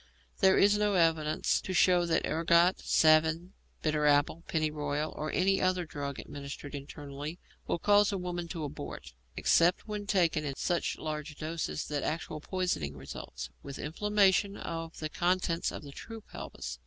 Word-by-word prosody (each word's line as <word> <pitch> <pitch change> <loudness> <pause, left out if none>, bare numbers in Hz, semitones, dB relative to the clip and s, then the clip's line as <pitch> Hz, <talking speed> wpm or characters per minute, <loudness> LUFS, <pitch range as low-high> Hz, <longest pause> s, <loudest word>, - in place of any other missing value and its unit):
There 190 -1 +5
is 205 +1 +5
no 210 -1 +2
evidence 160 -3 +2
to 185 - -4
show 180 -1 +4
that 165 - +1
ergot, 170 +3 +3
savin, 160 +3 +3 0.3
bitter 150 -1 +2
apple, 145 +3 +3
pennyroyal, 150 -1 -1
or 155 +1 -3
any 195 +1 +2
other 185 -1 +1
drug 140 -3 -5
administered 140 0 -8
internally, 145 +2 -7 0.3
will - - 0
cause 205 +3 +4
a 200 - -1
woman 175 -1 -4
to 165 -2 -5
abort, 140 - -7 0.2
except 175 +5 +3
when 210 -1 -4
taken 170 -6 +2
in 140 -2 -3
such 175 +3 -1
large 150 -1 -5
doses 160 0 -3
that 145 -1 -1
actual 155 -1 -3
poisoning 155 - -2
results, 65 -1 -7
with 140 - -8
inflammation 200 +3 +2
of 165 0 -5
the 155 - -3
contents 175 +1 0
of - - -7
the 140 - -9
true 225 +9 -9
pelvis. - - -7
165 Hz, 155 wpm, -31 LUFS, 150-185 Hz, 0.3 s, There